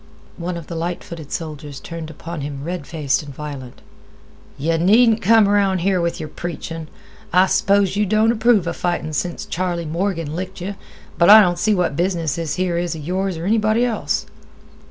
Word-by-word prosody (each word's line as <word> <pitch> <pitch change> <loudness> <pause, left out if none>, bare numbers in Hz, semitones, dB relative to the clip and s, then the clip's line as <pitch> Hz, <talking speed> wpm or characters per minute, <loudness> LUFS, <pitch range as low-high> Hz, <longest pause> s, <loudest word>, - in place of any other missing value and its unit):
One 175 0 -4
of 170 - -8
the 170 - -8
light 170 +1 -3
footed 160 -4 -9
soldiers 150 -3 -5
turned 165 -2 -7
upon 160 +1 -7
him 140 -1 -5
red 170 -2 -5
faced 150 -5 0
and 145 -2 -9
violent. 140 -4 -8 0.7
"Yeh 165 +4 0
needn't 220 +6 +4
come 220 +1 +5
around 200 -3 +2
here 185 0 +2
with 170 0 -1
yer 155 - -4
preachin'. 165 -1 -6 0.4
I 185 +2 +5
s'pose 200 0 +2
yeh 210 +1 +2
don't 215 +3 +3
approve 225 -4 +3
'a 170 - -2
fightin' 175 -3 -2
since 175 +3 -2
Charley 175 -1 -2
Morgan 165 -1 -2
licked 185 +2 -5
yeh; 190 +3 -4 0.5
but 170 - +5
I 215 +1 +11
don't 175 -4 +3
see 215 -1 +2
what 180 -6 0
business 170 -3 0
this 165 -3 -2
here 180 -2 0
is 175 -1 -2
'a - - -7
yours 185 +3 -2
or 165 - -5
anybody 215 +3 +2
else." 230 -3 -1
175 Hz, 190 wpm, -20 LUFS, 160-195 Hz, 0.7 s, I